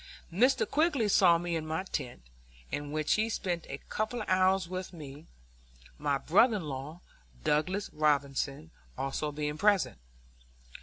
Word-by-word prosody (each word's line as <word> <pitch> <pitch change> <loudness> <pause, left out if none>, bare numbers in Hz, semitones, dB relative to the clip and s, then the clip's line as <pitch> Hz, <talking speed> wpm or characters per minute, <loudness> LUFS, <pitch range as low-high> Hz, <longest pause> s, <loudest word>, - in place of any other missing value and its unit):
Mr. 250 +9 +3
Quigg 290 -9 +2
saw 175 -4 +6
me 170 0 -2
in 160 - -2
my 160 +4 -2
tent, 125 - -5 0.5
in 145 0 -4
which 155 0 +1
he 220 +1 +1
spent 175 -6 -2
a 140 - -4
couple 220 +2 -2
of - - -12
hours 185 0 +3
with 185 +1 -5
me, 150 -2 -10 0.7
my 145 -1 +1
brother 215 - +4
in 190 - -5
law, 150 +4 -6 0.4
Douglas 185 +7 0
Robinson, 145 0 0 0.3
being 135 - -1
also 150 +2 -2 0.3
present. 200 - +2
170 Hz, 145 wpm, -30 LUFS, 150-195 Hz, 0.7 s, saw